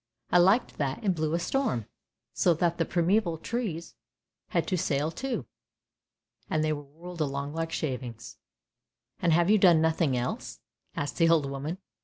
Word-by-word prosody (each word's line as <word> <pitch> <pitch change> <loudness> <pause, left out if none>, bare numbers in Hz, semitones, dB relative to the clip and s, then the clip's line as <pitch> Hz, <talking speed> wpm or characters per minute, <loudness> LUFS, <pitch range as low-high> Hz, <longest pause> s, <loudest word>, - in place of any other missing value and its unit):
I 180 - +6
liked 195 +8 +3
that 140 - -2
and 195 -3 +2
blew 160 -1 -1
a - - 0
storm, 175 - 0 0.5
so 145 +9 +3
that 170 +1 0
the 165 - +2
primeval 175 +1 +1
trees 175 -4 -4 0.5
had - - 0
to 185 - +1
sail 155 -3 0
too, 260 +8 -3 1.0
and 155 0 +1
they 155 0 +1
were 145 - -5
whirled 165 +4 -9
about 140 0 -2
like 165 0 -3
shavings." 125 -7 -4 0.4
" 120 +2 -56
And 170 - +3
you - - +5
have 195 +5 +4
done 175 -4 +6
nothing 160 -4 +2
else? 125 +1 -4 0.2
" - - -41
asked 145 - -3
the 165 -1 +4
old 165 -4 +4
woman. 140 +5 -4
165 Hz, 175 wpm, -28 LUFS, 145-175 Hz, 1.0 s, I